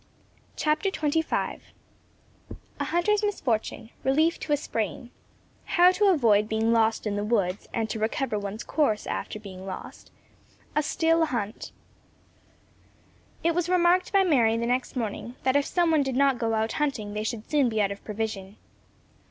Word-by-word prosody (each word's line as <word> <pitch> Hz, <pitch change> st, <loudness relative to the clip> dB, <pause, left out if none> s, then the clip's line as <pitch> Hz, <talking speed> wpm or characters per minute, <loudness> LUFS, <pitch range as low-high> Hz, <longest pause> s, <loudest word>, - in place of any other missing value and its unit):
CHAPTER 305 Hz, +5 st, +1 dB
XXV 315 Hz, -2 st, -1 dB, 1.2 s
A -, -, 0 dB
HUNTER'S 400 Hz, +5 st, +1 dB
MISFORTUNE 235 Hz, -, -2 dB
RELIEF 310 Hz, +5 st, +2 dB
TO 305 Hz, -, -5 dB
A 290 Hz, -, +4 dB
SPRAIN 225 Hz, -, -4 dB, 0.7 s
HOW 355 Hz, +1 st, +8 dB
TO 410 Hz, +3 st, +1 dB
AVOID 225 Hz, -, +4 dB
BEING 225 Hz, +1 st, +1 dB
LOST 225 Hz, -1 st, +2 dB
IN 205 Hz, -1 st, -1 dB
THE 205 Hz, -, -1 dB
WOODS, 205 Hz, -3 st, -1 dB
AND 225 Hz, -1 st, -1 dB
TO 220 Hz, -, -4 dB
RECOVER 220 Hz, 0 st, -1 dB
ONE'S 200 Hz, +2 st, -5 dB
COURSE 275 Hz, -9 st, 0 dB
AFTER 215 Hz, -, -4 dB
BEING 190 Hz, -3 st, -10 dB
LOST 190 Hz, -, -8 dB, 0.7 s
A 300 Hz, -, +3 dB
STILL 325 Hz, +1 st, +2 dB
HUNT 225 Hz, -5 st, -4 dB, 1.7 s
It 335 Hz, 0 st, +2 dB
was 350 Hz, +1 st, -1 dB
remarked 360 Hz, 0 st, +3 dB
by 395 Hz, -1 st, +4 dB
Mary 240 Hz, -10 st, +3 dB
the 235 Hz, -, -1 dB
next 250 Hz, +3 st, -1 dB
morning, 235 Hz, +1 st, -4 dB
that 260 Hz, +1 st, +2 dB
if 285 Hz, -1 st, +2 dB
some 345 Hz, -2 st, +2 dB
one 310 Hz, -2 st, +4 dB
did 270 Hz, -2 st, -2 dB
not 275 Hz, -2 st, +3 dB
go 225 Hz, -1 st, 0 dB
out 220 Hz, +1 st, 0 dB
hunting 255 Hz, -9 st, -2 dB
they 210 Hz, 0 st, -2 dB
should 220 Hz, -1 st, -4 dB
soon 285 Hz, -5 st, +2 dB
be 220 Hz, -1 st, -1 dB
out 200 Hz, -1 st, +2 dB
of 200 Hz, -, -8 dB
provision. 210 Hz, -2 st, -5 dB
240 Hz, 160 wpm, -26 LUFS, 215-315 Hz, 1.7 s, HOW